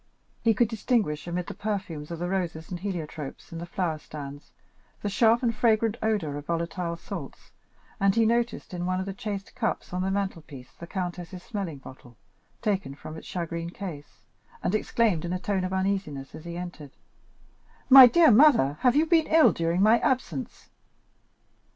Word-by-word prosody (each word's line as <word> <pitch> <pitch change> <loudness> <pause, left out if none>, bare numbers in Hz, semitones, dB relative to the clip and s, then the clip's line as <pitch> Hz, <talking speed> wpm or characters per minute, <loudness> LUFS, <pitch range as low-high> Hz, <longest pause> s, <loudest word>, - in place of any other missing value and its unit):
He 225 -2 +3
could 235 +3 +3
distinguish 215 - -1
amid 175 0 -2
the - - -6
perfumes 190 -8 -4
of 170 - -5
the 175 +2 -3
roses 175 -4 -3
and 175 - -4
heliotropes 160 -7 -6
in 165 - -6
the 170 - -6
flower 170 -3 -2
stands, 145 -1 -9 0.5
the 205 - 0
sharp 230 +4 +3
and 235 -1 +2
fragrant 220 0 +2
odor 200 -10 -1
of 145 - -13
volatile 170 +1 -2
salts, 170 -5 -8 0.5
and 195 0 +3
he 230 -1 +4
noticed 235 -2 0
in 175 0 -3
one 185 0 0
of 190 - -3
the 195 - -4
chased 200 0 -6
cups 230 -7 -3
on 180 - -1
the 190 - 0
mantle 195 -3 -2
piece 130 -5 -12
the 170 - -11
countess's 180 -1 -5
smelling 195 -9 -4
bottle, 130 -3 -14 0.5
taken 195 -10 -1
from 155 +2 -9
its 160 - -10
shagreen 170 -1 -4
case, 175 -6 -8 0.4
and - - 0
exclaimed 215 -5 +1
in 175 +1 -3
a 185 - -2
tone 195 -1 -1
of 185 - -2
uneasiness, 190 -8 -2
as 155 - -10
he 170 0 -6
entered: 175 -6 -8 0.9
"My 265 -1 +11
dear 325 +3 +6
mother, 220 - +5
have 250 0 +3
you 305 +2 +4
been 325 -1 +3
ill 320 -1 +6
during 170 +3 +1
my 220 +3 +5
absence?" 170 - -2
185 Hz, 180 wpm, -27 LUFS, 165-215 Hz, 0.9 s, My